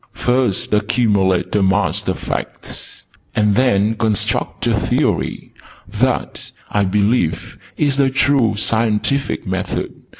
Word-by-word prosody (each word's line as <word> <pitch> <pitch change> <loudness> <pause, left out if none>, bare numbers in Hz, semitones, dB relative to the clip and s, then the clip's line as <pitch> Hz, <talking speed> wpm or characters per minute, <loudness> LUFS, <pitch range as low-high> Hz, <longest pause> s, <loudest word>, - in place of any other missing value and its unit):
'First 125 -6 0
accumulate 100 -4 +1
a 105 - +3
mass 95 0 +1
of - - 0
Facts: - - -6 0.3
and 105 -1 +3
then 110 -4 +2
construct 110 -3 -1
a - - +2
Theory.' - - -1 0.3
That, 120 +6 -2 0.2
I 100 -1 +2
believe, 100 -4 0 0.2
is 140 -2 +1
the 140 -1 +3
true 130 -5 +2
Scientific 110 +5 0
Method. 95 0 -3
105 Hz, 110 wpm, -18 LUFS, 100-125 Hz, 0.3 s, a